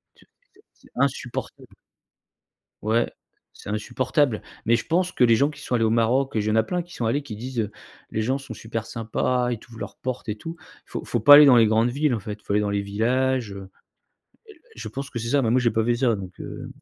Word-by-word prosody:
Tu - - -23 0.3
c'est 410 - -23
c'est - - -23
insupportable 130 -3 -2 1.2
ouais, 110 +2 +1 0.4
c'est - - -11
insupportable, 125 +3 0 0.2
mais 115 +1 +4
je 115 - -3
pense 180 +3 0
que - - +2
les 115 -1 +6
gens 140 +4 +3
qui 150 - -11
sont - - -5
allés 115 -2 +3
au - - +2
Maroc 120 +4 +1
et - - +2
il 105 0 0
y 110 - +3
a 110 - +4
plein 180 +9 -2
qui 175 +1 -13
sont 120 - -3
allés 140 +6 0
qui 110 -7 -8
disent: 115 -3 -3 0.4
«Les 110 - -1
gens 130 +5 0
sont 135 -4 -9
super 110 0 -5
sympas, 120 +2 -1
ils 115 - -6
t'ouvrent 115 0 -14
leurs - - -7
portes» 130 -1 -5
et 105 - -1
tout. 165 +10 -8 0.3
Faut - - -6
faut 120 - -1
pas 145 +6 +10
aller 150 0 +10
dans 135 -3 +7
les 115 -2 +6
grandes 110 +2 +3
villes, 140 +2 +1
en 115 - -1
fait, 105 +1 -7
faut - - -7
aller 105 - +3
dans 105 - -1
les 100 0 0
villages, 120 +3 0
heu, 95 -1 -9 0.8
et - - -14
l 420 - -15
et - - -23
l - - -37
je - - -7
pense 140 +1 -6
que 120 - -4
c'est 115 - -4
ça, 140 +3 +2
mais 115 - +1
moi, 125 +2 +3
j'ai 120 -1 +2
pas 110 0 0
fait 120 +1 +2
ça, 120 -3 +2
donc, 95 -2 -8
heu, - - -7
120 Hz, 255 wpm, -24 LUFS, 110-135 Hz, 1.2 s, pas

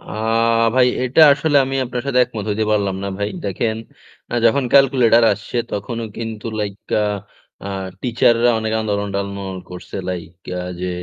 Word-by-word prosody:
আ - - -20 0.7
ভাই 130 -1 +5 0.2
এটা 130 +5 +2
আসলে 145 +1 +1
আমি 135 +1 -3
আপনার 125 0 -4
সাথে 135 -2 +1
একমত 110 -3 -6
হইতে 110 +1 0
পারলাম 100 -2 +1
না - - -2
ভাই। 100 0 -1 0.2
দেখেন, 110 +3 -1 0.6
আ - - -1
যখন 125 +4 +3
ক্যালকুলেটর 125 -4 +5
আসছে 100 +4 -6 0.2
তখনও 115 +3 -4
কিন্তু 110 -1 -5
লাইক 100 -2 -3 0.3
আ - - +1 0.6
আ - - -4 0.3
টিচাররা 120 0 +3
অনেক 110 0 -2
আন্দোলন-টান্দোলন 100 -2 -3
করছে, 90 +2 -8
লাইক 90 -2 -5 0.3
আ - - -4 0.2
যে 90 - -2
110 Hz, 160 wpm, -19 LUFS, 100-125 Hz, 0.7 s, ভাই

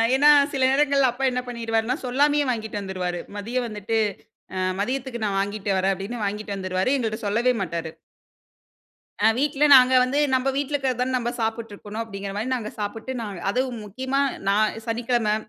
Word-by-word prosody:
ஏன்னா 290 +2 +6 0.2
சில 270 - -1
நேரங்கள்ல 275 -1 +3
அப்பா 255 +3 -6
என்ன 250 - -1
பண்ணிடுவாருன்னா, 230 0 -1
சொல்லாமயே 290 +3 +3
வாங்கிட்டு 220 -3 -4
வந்துருவாரு. 180 -2 -3 0.2
மதியம் 240 +4 -2
வந்துட்டு 210 +1 -2 0.6
அ - - -2 0.2
மதியத்துக்கு 255 +1 -3
நான் 195 -2 0
வாங்கிட்டு 200 0 -3
வரேன் 190 +1 +2
அப்பிடின்னு 210 +4 -5
வாங்கிட்டு 205 0 -3
வந்துருவாரு. 185 +4 -1
எங்கள்ட்ட 225 -3 -2
சொல்லவே 235 +5 +2
மாட்டாரு. 165 -2 -4 1.4
ஆ - - +7
வீட்ல 290 +1 +1
நாங்க 255 0 +7
வந்து 265 +3 -1 0.2
நம்ம 260 +1 +1
வீட்ல 285 +1 -2
இருக்கிறத 265 -3 0
தான 260 +1 -1
நம்ம 240 0 -2
சாப்பிட்டுருக்கணும் 220 -1 -4
அப்பிடிங்கிறமாரி 200 +1 -5
நாங்க 215 -3 -5
சாப்பிட்டு 225 +5 -4
நாங்க 205 -5 -5
அதுவும் 250 0 -2
முக்கியமா 260 +7 -2 0.3
நான் 210 +2 +2
சனிக்கிழமை 230 -2 0
230 Hz, 155 wpm, -24 LUFS, 205-255 Hz, 1.4 s, ஆ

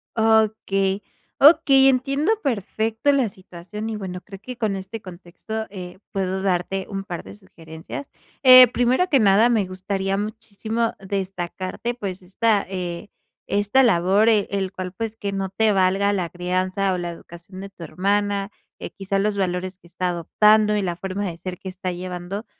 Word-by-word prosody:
Okey, 215 -3 +2 0.4
okey, 280 -3 +7
entiendo 275 - +2
perfecto 225 +1 0
la 265 -5 +2
situación. 190 +3 -8
Y 220 - -3
bueno, 185 -3 -5
creo 195 -1 -11
que 250 +2 -8
con 215 -4 -1
este 195 +3 -7
contexto, 185 +4 -7
eh, 180 -2 -9
puedo 190 -1 -2
darte 190 0 -1
un 195 -1 -4
par 175 -4 -6
de 95 +1 -11
sugerencias. 160 - -10 0.3
Eh, 255 -1 +10
primero 245 +8 +1
que 275 - +4
nada, 210 +2 +5
me 220 -5 +2
gustaría 190 +1 -2
muchísimo 220 +2 -3
destacarte, 190 +3 -4
pues, 195 -6 -6
esta, 200 +3 +1
eh, 180 +1 -5 0.4
esta 205 +6 +3
labor, 195 -1 +3
eh, 215 -3 +3
el 195 -1 -2
cual, 185 -1 -5
pues, 225 +2 -4
que 200 -2 -4
no 195 -1 -3
te 220 +3 +2
valga 195 +1 +2
la 185 -4 -1
crianza 185 +3 -1
o - - -1
la 175 -1 -3
educación 170 +3 -11
de 195 - -7
tu 185 -3 -12
hermana, 200 +3 -1 0.3
que - - -6
quizás 195 0 -2
los 205 0 0
valores 185 0 -2
que 170 - -19
está 180 +1 -2
adoptando 210 +5 +3
y 210 - +1
la 175 -3 -2
forma 190 +2 -4
de 170 -3 -5
ser 180 0 -6
que 190 - -7
está 185 0 -4
llevando. 180 +3 -6
195 Hz, 170 wpm, -22 LUFS, 185-220 Hz, 0.4 s, Eh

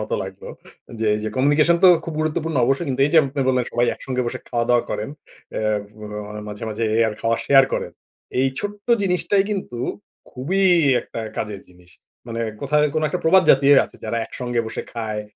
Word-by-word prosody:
মত 105 - -5
লাগলো, 95 0 -9 0.5
যে 110 - 0
এই 105 - -2
যে - - -1
কমিউনিকেশন 145 +5 +4
তো - - +10 0.2
খুব 165 - -5
গুরুত্বপূর্ণ 155 0 -1
অবশ্যই। 135 +6 0
কিন্তু 135 0 -2
এই - - -3
যে - - +4
আপনি 135 +1 -4
বললেন, 125 -2 +2
সবাই 120 +1 +2
একসঙ্গে 130 -1 -3
বসে - - -3
খাওয়া-দাওয়া 120 0 +2
করেন। 105 - -3 0.4
অ্যা - - -3 0.4
অ - - -6 0.4
মাঝে, 105 +1 -8
মাঝে 110 +2 -2 0.2
আবার 105 - -3
খাওয়া 115 0 +1
শেয়ার 135 -1 +7
করেন। - - -3 0.5
এই 135 - +3
ছোট্ট 205 +1 -6 0.2
জিনিসটাই 195 +1 +2
কিন্তু 185 - -4 0.5
খুবই 165 +10 -2 0.4
একটা 115 - -7 0.2
কাজের 105 -2 -4
জিনিস। 90 0 -19 0.4
মানে 115 0 -4 0.2
কোথায় 150 +2 +2
কোনো 155 0 +1
একটা - - -3
প্রবাদ 185 +3 +6
জাতীয় 140 +1 +6
আছে, - - -15
যারা 115 +2 -2
একসঙ্গে 120 -1 -3
বসে 110 - -5
খায়, 110 -2 -4
130 Hz, 185 wpm, -21 LUFS, 115-155 Hz, 0.5 s, তো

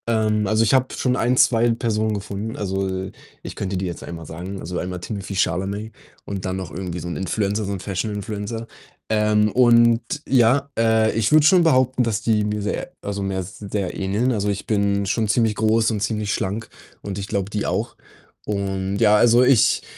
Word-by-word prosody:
Ähm, 110 -2 +1
also, 110 +2 +3
ich 115 - +2
habe 130 -1 +2
schon 125 -1 0
1, 125 +1 +1
2 120 -1 +4
Personen 110 -2 0
gefunden. 100 +2 -5
Also, 95 -1 -2 0.3
ich - - -7
könnte 95 -1 -3
dir 95 - -2
jetzt 85 - -6
einmal 85 -1 -8
sagen 90 +5 -7
also, 90 0 -4
einmal 90 0 -4
Timothée 100 +1 -6
Chalamet 95 +5 -1 0.3
und 100 -2 -5
dann 95 0 -2
noch 95 -5 -6
irgendwie 90 0 -5
so 85 - -6
'n 85 - -4
Influencer, 100 +2 -1
so 100 - -3
'n 95 - -4
Fashion-Influencer. 105 +3 -4 0.4
Ähm, 105 -1 +2
und 115 -1 +5 0.3
ja, 130 +2 +3
äh, 110 -1 +3
ich 115 0 +1
würde 155 -1 +6
schon 175 +2 +6
behaupten, 130 -5 +3
dass 115 -2 -1
die 110 -2 +1
mir 105 0 -2
sehr 105 - -3
also, 100 0 -4
mir 95 -1 -2
sehr 100 +1 -5
ähneln. 100 +6 0
Also, 105 -3 -1
ich 100 -1 -3
bin 100 -2 +1
schon 110 +3 0
ziemlich 110 0 +2
groß 110 +1 +2
und 110 - -2
ziemlich 105 0 -1
schlank 100 +4 -3 0.3
und 100 -1 -5
ich 100 - -5
glaube, 100 -1 -2
die 105 -1 -2
auch 110 +6 -2 0.5
und, 95 -1 -2
ja, 105 -1 +5
also, 120 +3 +5
ich 125 -3 +4
105 Hz, 190 wpm, -22 LUFS, 95-115 Hz, 0.5 s, würde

